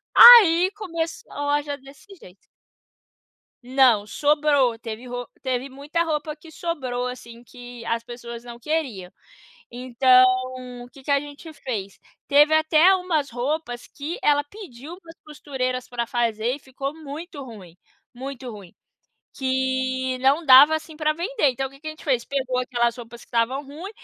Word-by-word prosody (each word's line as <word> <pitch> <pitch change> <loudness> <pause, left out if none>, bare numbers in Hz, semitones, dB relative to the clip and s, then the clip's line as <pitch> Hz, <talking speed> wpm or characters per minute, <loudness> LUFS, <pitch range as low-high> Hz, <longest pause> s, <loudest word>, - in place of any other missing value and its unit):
Aí, 385 -7 +9
começou 335 -6 -5
a 290 - -6 0.2
loja 290 -1 -4
desse 275 +7 -17
jeito. 185 - -16 1.3
Não, 250 -6 +3
sobrou. 285 -3 +2
Teve 225 +2 -8
ro 245 0 -5
teve 260 0 -3
muita 290 +5 -2
roupa 305 -2 -3
que 320 +1 -16
sobrou 260 -7 -4
assim, 235 -2 -9
que 245 0 -12
as 230 0 -2
pessoas 235 -1 -9
não 240 -1 -10
queriam. 250 - -3 0.6
Então, 255 +1 +4 0.7
que 270 -1 -16
que - - -5
a 280 - +3
gente 295 +2 -11
fez? 210 -9 -6 0.3
Teve 295 +2 +5
até 315 +4 +5
umas 325 -6 -2
roupas 245 0 -4
que 300 +5 -7
ela 290 -1 +3
pediu 325 - -11
para 335 -3 -15
as 330 - -18
costureiras 260 -4 -4
para 235 -1 -4
fazer 235 +1 -1
e - - -14
ficou 275 0 -6
muito 310 +1 -9
ruim, 195 -8 -12 0.4
muito 260 0 -7
ruim, 200 -5 -12 0.6
que 260 -1 -1
não 280 +5 +2
dava, 280 +4 +8
assim, 315 0 -10
pra 305 -1 +1
vender. 350 - 0
Então, 265 +2 -3
o - - -10
que 275 - -18
a 310 - -4
gente 310 - -13
fez? 255 -5 0
Pegou 260 -2 -2
aquelas 240 -1 -1
roupas 235 0 -11
que - - -17
estavam 245 +4 -1
ruim 325 +8 -9
270 Hz, 155 wpm, -23 LUFS, 245-305 Hz, 1.3 s, Aí